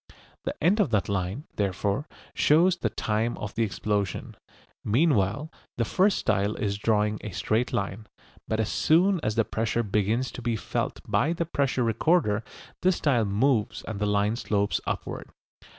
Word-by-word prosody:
The - - -4
end 190 +7 +4
of 200 - +3
that 105 -4 +1
line, 100 - -2
therefore, 100 - -1 0.3
shows 170 +4 +4
the - - -1
time 110 +2 -1
of 105 - -5
the 115 - -2
explosion. 105 -3 -2 0.5
Meanwhile 125 - +1 0.3
the 115 - +1
first 190 - +2
style 100 +1 +1
is 100 -1 -2
drawing 105 -1 +1
a 105 - -5
straight 110 +6 0
line, 100 +2 -3 0.4
but 110 - -1
as 110 - 0
soon 180 +4 +3
as 110 0 -1
the 115 -2 +2
pressure 115 +1 -1
begins 105 +4 0
to - - -8
be 120 -1 0
felt - - -3
by 155 +6 +2
the 170 0 -2
pressure 135 -5 0
recorder 115 - +2 0.4
this 185 0 +3
style 125 -9 +2
moves 105 +3 +1
and 110 -3 -5
the 105 - 0
line 105 +2 +1
slopes 100 -4 0
upward. - - -4
110 Hz, 165 wpm, -27 LUFS, 105-140 Hz, 0.5 s, end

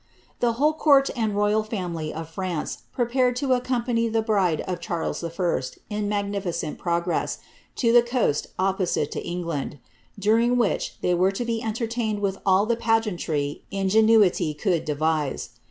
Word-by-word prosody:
The 240 -1 +2
whole 295 +6 +2
court 280 -3 +4
and 220 -4 -1
royal 210 +1 +2
family 175 -8 -4
of 160 0 -6
France 175 -1 -4
prepared 250 0 +1
to 265 0 +1
accompany 245 -2 0
the 225 0 0
bride 195 -7 +1
of 180 -2 -4
Charles 170 0 -3
I., 170 -2 -1 0.3
in 210 -1 -1
magnificent 200 -6 -2
progress, 170 0 -1 0.4
to 230 -3 +2
the 240 - +8
coast 240 - 0
opposite 190 -1 0
to - - -4
England; 170 -5 -4 0.4
during 225 +4 +3
wHich 235 -4 0
they 180 - +2
were 185 +2 +3
to 240 +5 -3
be 230 -1 -1
entertained 225 -1 -2
with 195 -1 -1
all 190 +2 +5
the 235 +1 +1
pa 225 -1 +3
geantry 160 -9 -3
ingenuity 195 -4 +3
could 170 0 0
devise. 150 -4 -1
205 Hz, 155 wpm, -24 LUFS, 175-230 Hz, 0.4 s, the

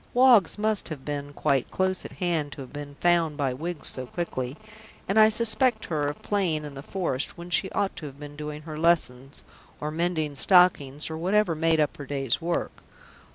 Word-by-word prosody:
Woggs 245 -9 +6
must 215 -1 +1
have 150 -5 -7
been 145 -1 -4
quite 140 -3 0
close 185 0 0
at - - -8
hand 165 -5 -1
to - - -8
have 130 - -10
been 145 -1 -7
found 170 -4 +2
by 135 -3 0
Wiggs 165 +5 -5
so 130 -1 -4
quickly, 130 -4 -4 0.5
and 200 +3 +3
I 215 0 +8
suspect 235 +3 +1
her 150 -3 -1
of 145 - -5
playing 175 -7 0
in 145 - -8
the 135 - -8
forest 145 -5 -2
when 170 +1 -9
she 190 - +1
ought 200 - 0
to 155 - -6
have 140 0 -12
been 145 0 -9
doing 150 0 -6
her 155 -1 -7
lessons, 140 -6 +1 0.4
or 150 +1 -3
mending 160 -2 -1
stockings, 150 -4 +4
or 160 - -4
whatever 190 +1 +2
made 160 0 +2
up 150 -2 +1
her 145 - -8
day's 135 0 0
work. 170 +1 -2
155 Hz, 200 wpm, -26 LUFS, 145-180 Hz, 0.5 s, I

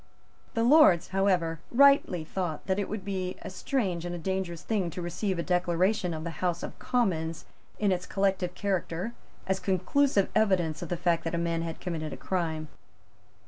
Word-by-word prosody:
The 230 - +2
Lords, 245 - +6
however, 180 -4 +1
rightly 275 - +5
thought 165 -2 -4
that 190 +1 0
it 200 - -2
would 205 -2 -5
be 185 -2 -3
a - - -6
strange 185 - -1
and 175 0 -4
a - - -4
dangerous 180 -1 -3
thing 200 -6 0
to 170 - -7
receive 180 +2 -2
a 170 - -1
declaration 180 +2 +1
of 155 - -5
the 170 - -3
House 175 -2 0
of - - -7
Commons 165 -10 -1 0.3
in 205 -2 +2
its 180 -1 -1
collective 190 -2 0
character 190 +1 -2 0.3
as 190 0 0
conclusive 200 +4 +2
evidence 185 -7 +2
of 175 - -5
the 175 - -1
fact 170 -1 +1
that 165 - -1
a - - 0
man 170 -1 0
had 165 -1 -5
committed 160 -4 -4
a - - -7
crime. 160 -4 -2
180 Hz, 185 wpm, -28 LUFS, 170-195 Hz, 0.3 s, Lords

